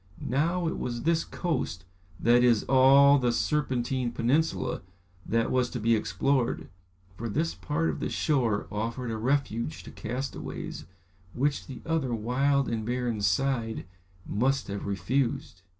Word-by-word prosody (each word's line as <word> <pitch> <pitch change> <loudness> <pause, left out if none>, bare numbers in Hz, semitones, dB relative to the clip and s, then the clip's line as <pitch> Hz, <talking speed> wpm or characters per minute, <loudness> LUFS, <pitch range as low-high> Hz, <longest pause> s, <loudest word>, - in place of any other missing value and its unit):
Now, 170 +6 +1
it - - -2
was 120 -1 -3
this 165 0 +2
coast, 95 - -3 0.3
that 120 +2 +4
is, 120 -3 +4
all 140 +2 +6
the 125 -2 +2
Serpentine 130 -2 0
peninsula, 135 +8 0 0.5
that 115 0 +1
was 125 -1 +2
to 125 - -4
be 115 +1 +3
explored, 115 +5 0 0.5
for 115 +4 -4
this 160 +9 0
part 165 +3 -1
of - - -6
the - - -2
shore 120 -9 +1
offered 115 +3 -3
a 110 - -2
refuge 130 +2 -1
to - - -10
castaways, 125 +4 -5 0.5
which 140 +3 0
the 130 -3 -9
other 155 -7 0
wild 135 +5 +1
and 115 -1 -2
barren 120 -2 -1
side 115 +3 0 0.4
must 130 +5 0
have 100 0 -4
refused. 100 0 -1
125 Hz, 140 wpm, -28 LUFS, 115-140 Hz, 0.5 s, all